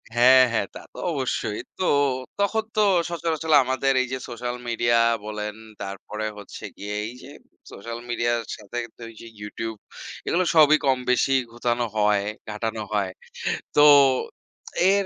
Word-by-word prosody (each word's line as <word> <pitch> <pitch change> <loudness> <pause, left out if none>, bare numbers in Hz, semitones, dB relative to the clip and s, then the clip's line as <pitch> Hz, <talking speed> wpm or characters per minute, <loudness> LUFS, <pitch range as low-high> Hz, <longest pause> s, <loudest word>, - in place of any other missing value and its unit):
হ্যাঁ, 130 +2 +7
হ্যাঁ, 110 -4 0
তা - - -8
তো - - -14
অবশ্যই। 130 -7 -2 0.2
তো - - -2 0.6
তখন 220 +2 +1
তো 215 - +3 0.3
সচরাচর 160 -2 -1
আমাদের 130 +1 +1
এইযে 130 +1 -3
সোশ্যাল 120 +1 -4
মিডিয়া 120 0 +2 0.3
বলেন, 105 -1 -4 0.3
তারপরে 100 +2 -5
হচ্ছে 100 - -10
গিয়ে 105 +1 -5
এইযে 125 +3 -11 0.4
সোশ্যাল 115 +3 -7
মিডিয়ার 120 0 0 0.2
সাথে 105 +2 -8 0.4
যে - - -11 0.2
YouTube। 110 +2 -5 0.5
এগুলো 180 +2 +1
সবই 155 -1 +7
কমবেশি 125 0 +2 0.2
গুতানো 120 0 -1
হয়, 105 -1 +3 0.2
ঘাটানো 110 +1 -3
হয়। 100 -3 0 0.6
তো 145 - +6 1.1
এর 200 -1 +2
120 Hz, 130 wpm, -24 LUFS, 105-135 Hz, 1.1 s, হ্যাঁ